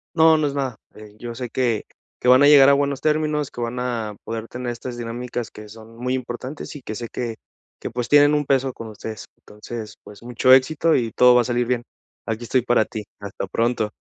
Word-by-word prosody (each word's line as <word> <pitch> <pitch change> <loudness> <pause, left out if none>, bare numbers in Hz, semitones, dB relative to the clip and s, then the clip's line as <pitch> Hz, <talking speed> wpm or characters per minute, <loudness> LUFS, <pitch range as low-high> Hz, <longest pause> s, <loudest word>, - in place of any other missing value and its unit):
No, 160 -1 +6
no 155 -1 +1
es 140 - -3
nada. 135 -4 -2 0.2
Eh, 105 -1 -13
yo 120 0 -6
sé 125 0 -5
que 120 -3 0 0.4
que - - -3
van 130 +2 +7
a 145 - +7
llegar 140 -2 +8
a - - +6
buenos 140 -1 0
términos, 150 -1 0
que 120 - -7
van 120 +1 -3
a 115 -4 -3
poder 115 0 -5
tener 125 0 -5
estas 120 +1 -7
dinámicas 120 -1 -5
que 105 0 -11
son 110 +1 -13
muy 125 +2 -1
importantes, 130 +4 -6
y 145 - -8
que 110 -3 -6
sé 120 +1 -6
que 120 -2 -4 0.4
que - - -6
pues, 120 +1 -4
tienen 145 0 +6
un 150 0 +1
peso 135 -1 +1
con 115 - -8
ustedes. 110 0 -8
Entonces, 105 0 -9
pues, 105 +2 -14
mucho 125 +2 +2
éxito 150 +5 +4
y 115 -3 0
todo 125 +1 +6
va 125 - +6
a - - 0
salir 120 0 -1
bien. 120 -1 0 0.4
Aquí 115 +1 -3
estoy 125 +1 +1
para 120 -3 +3
ti. 110 0 -6 0.2
Hasta 100 -1 -6
pronto. 115 +1 -1
120 Hz, 225 wpm, -22 LUFS, 115-135 Hz, 0.4 s, llegar